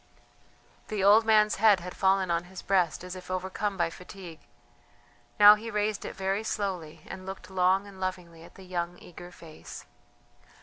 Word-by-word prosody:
The 210 -3 -2
old 210 +3 +6
man's 215 -1 +4
head 205 -2 +5
had 180 +1 -8
fallen 190 -1 +2
on 170 +1 0
his 185 +1 -10
breast 180 -4 +1
as 180 0 -7
if 185 0 -11
overcome 190 +2 -3
by 170 -2 0
fatigue; 180 -2 -11 1.0
now 205 0 +10
he 215 +2 -5
raised 210 -1 -2
it - - -7
very 195 +2 -2
slowly 185 -8 -4
and 190 -1 -9
looked 190 -1 -8
long 190 +1 +2
and 195 -2 -13
lovingly 180 -3 -5
at 165 - -15
the 190 - -13
young 175 -1 -4
eager 175 0 -12
face. 165 -3 -12
190 Hz, 170 wpm, -28 LUFS, 180-200 Hz, 1.0 s, now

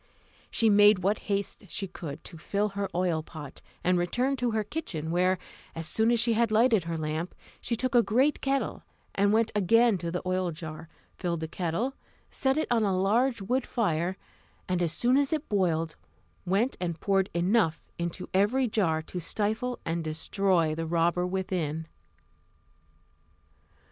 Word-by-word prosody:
She 225 - +2
made 205 -2 +6
what 200 +3 +2
haste 200 +1 -2
she 195 +6 -3
could 160 -5 -8
to - - -10
fill 205 +5 0
her 200 0 -3
oil 175 -3 +1
pot, 155 -3 -10 0.2
and 180 0 +3
returned 250 +9 0
into 245 - +2
her 220 -1 0
kitchen, 185 - -4
where, 185 +2 +2 0.4
as 165 0 -5
soon 220 +7 +1
as 235 -1 +3
she 235 0 +3
had 230 +1 +2
lighted 220 -4 +3
her 165 -1 -2
lamp, 155 +2 -3 0.3
she 235 - -1
took 255 +2 -2
a 240 - +7
great 255 +7 +2
kettle, 275 0 -1 0.3
went 215 +3 +3
again 215 +1 +4
to 170 - -3
the 180 +1 -3
oil 185 0 0
jar, 160 0 -8 0.3
filled 170 -3 -2
the 160 - -2
kettle, 180 +10 -2 0.4
set 265 +1 0
it 310 - 0
on 235 -2 +3
a 195 -3 +1
large 230 +4 +2
wood 250 +6 0
fire, 185 -5 0 0.5
and 180 -1 0
as 170 -2 +1
soon 245 +9 +2
as 280 -1 +2
it 310 -1 -1
boiled 165 -6 0 0.5
went 205 +8 +1
and 170 -2 -2
poured 195 -1 +1
enough 175 -1 +2 0.2
into 170 +1 -3
every 220 +7 +3
jar 165 -8 +1
to 180 - -6
stifle 220 +7 -1
and 165 0 -1
destroy 165 +1 +1
the 165 +1 -3
robber 175 +2 +1
within. 180 -4 -2
190 Hz, 165 wpm, -28 LUFS, 170-225 Hz, 0.5 s, a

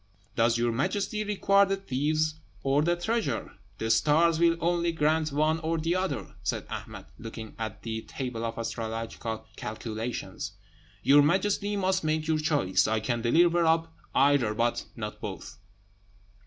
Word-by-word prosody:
"Does 115 0 +3
your 120 0 +1
Majesty 200 - -1
require 200 -1 +3
the 195 - +1
thieves 155 -1 0 0.2
or 140 +1 +3
the 170 +3 +2
treasure? 220 +6 -1 0.3
The 110 0 -1
stars 160 +7 +4
will 170 0 +4
only 170 0 +1
grant 155 0 +1
one 155 +3 +2
or 165 +1 -1
the 165 +2 0
other," 145 - -2
said - - -2
Ahmed, - - -6
looking 110 -1 -8
at 110 -1 -4
his 110 -1 -4
table 125 -4 -4
of 115 0 -3
astrological 115 -1 -4
calculations. 110 +2 -5 0.5
"Your 140 +3 +7
Majesty 200 +6 +1
must 190 -2 +1
make 155 0 0
your 160 -1 +2
choice. 145 - +2
I 110 0 +1
can 120 +2 -1
deliver 170 +8 +4
up 165 0 +2 0.2
either, 135 -6 +4
but 120 +1 0
not - - -6
both." - - -7
150 Hz, 150 wpm, -28 LUFS, 115-170 Hz, 0.5 s, Your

